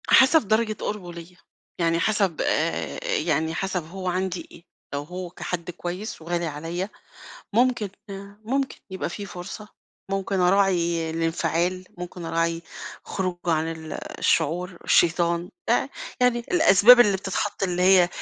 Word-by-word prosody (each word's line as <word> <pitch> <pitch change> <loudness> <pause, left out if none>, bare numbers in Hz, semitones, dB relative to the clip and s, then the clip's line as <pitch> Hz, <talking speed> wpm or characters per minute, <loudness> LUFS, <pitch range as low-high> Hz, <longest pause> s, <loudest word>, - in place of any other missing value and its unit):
حسب 265 -2 +6
درجة 220 +1 +2
قُربه 185 -5 -4
ليَّ، 170 +1 -11 0.4
يعني 165 -1 +2
حسب 195 -3 +1
آآ - - 0
يعني 425 - 0
حسب 185 -1 -2
هو 185 +2 -6
عندي 185 0 -2
إيه، 170 - -14 0.3
لو 140 0 -2
هو 180 +3 -6
كحد 175 0 -5
كويس 180 +3 -6
وغالي 170 +1 -2
عليَّ 165 +5 -4 0.6
ممكن 235 -1 +2 0.2
آآ 200 +1 -9
ممكن 265 +4 -1
يبقى 190 - -3
في 200 +3 -6
فرصة، 195 +3 -8 0.4
ممكن 195 -1 -1
أراعي 180 -3 +2
الانفعال، 165 +2 0
ممكن 180 0 -7
أراعي 165 0 0 0.4
خروجه 185 -2 -3
عن 160 0 +1
ال 160 -1 -8 0.3
الشعور، 170 +3 +1
شيطان، 170 0 +3 0.2
آآ - - +2 0.3
يعني 250 -1 +4
الأسباب 245 - +7
اللي 205 -5 +5
بتتحط 195 +2 -3
اللي 180 -2 +1
هي 185 -1 +6
180 Hz, 135 wpm, -25 LUFS, 170-200 Hz, 0.6 s, الأسباب